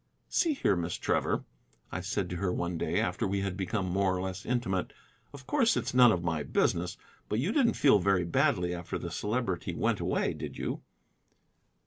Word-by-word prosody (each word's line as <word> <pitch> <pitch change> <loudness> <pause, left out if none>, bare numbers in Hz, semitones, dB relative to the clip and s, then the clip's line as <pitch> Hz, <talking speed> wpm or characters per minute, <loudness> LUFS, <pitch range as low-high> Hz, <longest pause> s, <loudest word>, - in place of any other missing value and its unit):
"See 325 -4 +2
here, 100 - +2
Miss 85 -1 -2
Trevor," - - 0 0.5
I 90 - -3
said 100 0 -2
to 90 - -3
her 90 0 0
one 85 0 -2
day - - 0
after - - 0
we 100 +1 -1
had 100 -2 -2
become 100 +1 -2
more 95 0 +1
or - - -3
less 95 +1 -5
intimate, 115 -7 -1 0.4
"of 135 -2 -12
course 245 - +3
it's - - -2
none 125 -2 +7
of 85 -4 0
my 80 -3 0
business, 85 +4 0 0.3
but 105 - 0
you 145 - 0
didn't 240 -3 +3
feel 135 -8 +5
very 95 -1 +2
badly 90 +1 +1
after 85 -1 -4
the 85 - -6
Celebrity 105 -3 -2
went - - +1
away, - - 0
did - - -7
you?" - - -3
95 Hz, 190 wpm, -30 LUFS, 90-120 Hz, 0.5 s, none